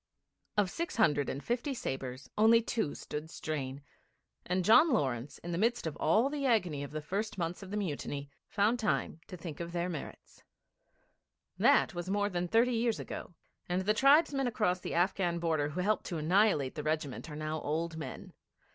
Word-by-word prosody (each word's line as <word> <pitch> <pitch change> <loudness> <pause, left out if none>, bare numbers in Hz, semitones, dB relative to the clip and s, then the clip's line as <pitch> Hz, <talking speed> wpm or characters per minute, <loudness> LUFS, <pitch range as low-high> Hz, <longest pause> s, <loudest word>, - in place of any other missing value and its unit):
Of 200 -3 +2
six 335 +1 -3
hundred 145 - +3
and 140 - -4
fifty 250 +4 -1
sabres 130 - -5
only 225 +2 +6
two 225 -7 -2
stood 150 +2 -6
strain, 140 -4 -4 0.6
and 180 0 0
John 265 - +7
Lawrence 130 - -1
in 175 - -7
the 170 - -1
midst 235 +1 +1
of 160 - -3
all 215 - +3
the 285 0 -3
agony 180 - +1
of 140 - -6
the 155 0 -5
first 200 +6 -3
months 175 +1 -3
of 195 - -9
the 205 - -3
mutiny 145 -6 -4 0.2
found 215 +4 +1
time 160 - -1
to 180 - -8
think 165 -3 -7
about 170 0 -5
their 175 +1 -1
merits. 160 -5 -8 1.2
That - - +4
was 175 +1 -5
more 205 +1 +1
than 180 -2 -2
thirty 235 +6 +3
years 230 -1 +1
ago, 175 - -7 0.3
and 180 +1 0
the 210 +3 +3
tribesmen 275 +2 +4
across 210 -6 +1
the - - -5
Afghan 175 0 +1
border 160 -4 0
who 160 +5 -3
helped 210 +3 0
to 175 - -3
annihilate 160 -4 +3
the 150 - -4
regiment 155 -1 -2
are 150 - -7
now 155 +1 -3
old 160 +2 -2
men. 160 - -7
175 Hz, 185 wpm, -32 LUFS, 155-215 Hz, 1.2 s, John